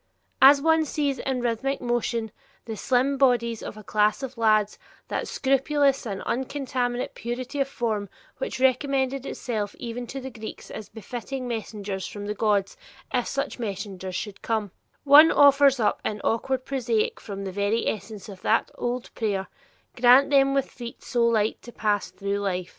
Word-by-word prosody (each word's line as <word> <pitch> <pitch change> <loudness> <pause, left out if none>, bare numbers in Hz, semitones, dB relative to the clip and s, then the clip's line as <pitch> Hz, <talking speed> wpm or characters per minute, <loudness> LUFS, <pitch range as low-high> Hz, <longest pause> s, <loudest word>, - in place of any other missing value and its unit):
As 275 +1 +8
one 320 0 +4
sees 285 -3 -1
in 260 -2 -2
rhythmic 245 +3 -1
motion 235 -2 -1 0.3
the 225 - -5
slim 260 +4 +1
bodies 235 -4 +2
of - - -7
a 215 - -10
class 210 +5 +1
of 265 0 -5
lads, 215 -2 +2 0.3
"that - - -2
scrupulous 275 0 +1
and 195 -2 -4
uncontaminate 250 -1 -2
purity 250 +4 -5
of 275 - +2
form 220 -6 -2 0.3
which - - -4
recommended 265 0 +1
itself 215 -4 -3
even 240 0 -5
to 270 - -5
the 265 0 -7
Greeks 220 -1 -9
as 215 - -8
befitting 245 +4 -6
messengers 205 -4 -4
from 205 -1 -7
the 210 - -2
gods, 205 -2 0 0.4
if 245 -2 +1
such 275 -2 -3
messengers 195 -4 -5
should 205 +1 -5
come," 220 -4 -1 0.3
one 295 +3 +8
offers 280 -2 +6
up 210 -2 +1
in 210 - -2
awkward 255 +3 -1
prosaic 240 -5 -1
form 200 -1 -7
the 190 - -4
very 200 +4 0
essence 215 -1 -4
of 195 -3 -10
that 225 - +1
old 245 0 -3
prayer, 200 -4 -2 0.5
"Grant 250 +4 +6
them 275 -1 +4
with 275 - +1
feet 240 -1 -9
so 235 -2 +1
light 220 -2 +1
to 240 - -11
pass 210 -3 0
through 200 0 -3
life." 185 -3 -2
240 Hz, 165 wpm, -25 LUFS, 210-265 Hz, 0.5 s, As